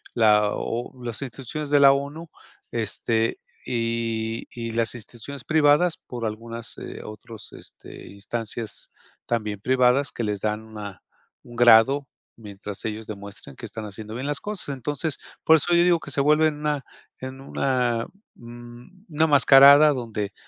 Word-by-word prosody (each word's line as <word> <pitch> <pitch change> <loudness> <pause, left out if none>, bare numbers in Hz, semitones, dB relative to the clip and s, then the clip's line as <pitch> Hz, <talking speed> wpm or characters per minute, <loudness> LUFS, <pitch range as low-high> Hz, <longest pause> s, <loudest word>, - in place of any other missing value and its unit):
la 105 -2 +4
o 120 +3 -4
las 120 0 -5
instituciones 135 +3 -6
de 145 0 +4
la 140 - +9
ONU, 145 +4 -5 0.4
este, 115 0 -1 0.3
y 115 -1 -2
y 115 -1 -5
las 115 +1 +1
instituciones 120 +4 -8
privadas 155 +2 +3
por 120 -2 -7
algunas, 115 +1 -5
eh, - - -8
otros, 110 0 -10
este, - - -12
instancias 110 +2 -5 0.3
también 105 -3 -2
privadas 130 +2 +2
que 120 - -4
les 105 -2 -2
dan 105 0 -1
una 105 -3 -9 0.4
un 120 - -13
grado 120 +4 +6 0.3
mientras 105 -2 -9
ellos 110 0 -5
demuestran 100 -9 -9
que - - -9
están 110 -1 -7
haciendo 105 +1 -8
bien 130 +4 -4
las 145 -1 -1
cosas. 210 -6 -4
Entonces, 140 +2 -3 0.3
por 160 - +6
eso 175 +3 +1
yo 170 - +5
digo 175 -1 +3
que 140 - -9
se 140 - +1
vuelven 150 +1 +3
una 150 -3 -2 0.3
en 130 +1 -8
una, 125 -4 0 0.3
mm, 120 - -13
una 155 0 +2
mascarada 140 +1 +8
donde 110 -5 -4
120 Hz, 150 wpm, -24 LUFS, 110-140 Hz, 0.4 s, la